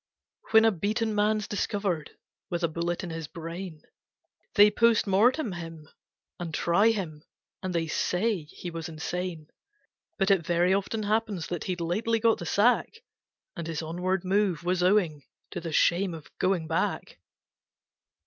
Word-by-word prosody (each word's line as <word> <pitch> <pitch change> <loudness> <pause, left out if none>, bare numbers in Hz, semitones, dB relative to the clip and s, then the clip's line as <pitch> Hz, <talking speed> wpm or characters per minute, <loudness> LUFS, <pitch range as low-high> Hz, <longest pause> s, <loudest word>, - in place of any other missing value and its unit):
When 220 0 +6
a 225 - +5
beaten 215 +4 -1
man's 210 0 +1
discovered 200 -6 -2 0.4
with 175 -1 -2
a - - +4
bullet 170 +2 -2
in 175 - -5
his 165 -2 -5
brain, 165 0 -7 0.7
They 210 -1 +7
POST 230 +1 +3
MORTEM 220 +6 +3
him, 165 -3 -8 0.5
and 175 -2 -4
try 200 +6 +3
him, 170 -9 -3 0.4
and 185 -2 -3
they 165 -1 +1
say 180 +2 0
he 175 +3 -8
was 165 0 -5
insane; 165 0 -4 0.7
But 195 -1 +2
it 190 -4 +3
very 175 +3 +2
often 200 +3 -1
happens 210 -4 0
that 175 -2 -3
he'd 180 -1 -2
lately 220 +7 0
got 225 0 +3
the 170 - -5
sack, 245 - +2 0.5
And 170 -3 -5
his 165 -1 -3
onward 180 +3 -2
move 190 -3 +1
was 180 0 0
owing 180 -6 +2 0.3
to 175 - -5
the 165 -1 -5
shame 175 +3 +2
of 155 -2 -13
going 185 -3 +1
back. 165 +2 -2
180 Hz, 155 wpm, -28 LUFS, 165-210 Hz, 0.7 s, They